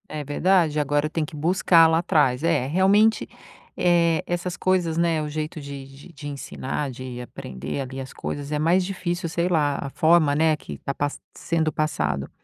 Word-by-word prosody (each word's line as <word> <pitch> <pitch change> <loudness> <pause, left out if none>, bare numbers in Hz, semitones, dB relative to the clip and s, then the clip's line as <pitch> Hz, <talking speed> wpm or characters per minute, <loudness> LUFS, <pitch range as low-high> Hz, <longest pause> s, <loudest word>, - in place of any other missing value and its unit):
É 150 -1 -5
verdade, 160 +1 +2
agora 145 +1 +1
tem 160 0 -1
que 155 +1 -7
buscar 165 +1 +4
lá 160 0 +2
atrás. 145 -5 +2
É, 165 -6 +1
realmente, 195 +7 +3 0.5
eh, 170 -2 +3
essas 175 +1 -3
coisas, 180 -3 +1
né, 170 -2 +2
o 150 - -4
jeito 155 +1 -4
de 140 -1 -8
de-de 145 +2 -11
ensinar, 140 0 -4
de 125 -1 -7
aprender 70 - -6
ali, 130 0 -6
as 130 -1 -7
coisas, 145 0 -5
é 150 - 0
mais 170 +4 +3
difícil, 175 -2 -3
sei 170 +2 0
lá, 150 -5 +1
a 140 - -4
forma, 155 0 +3
né, 155 +1 +3
que 75 - -9
tá 140 - -4
passa 145 +1 -3 0.2
sendo 160 -2 -1
passado. 75 - -1
155 Hz, 180 wpm, -24 LUFS, 140-170 Hz, 0.5 s, buscar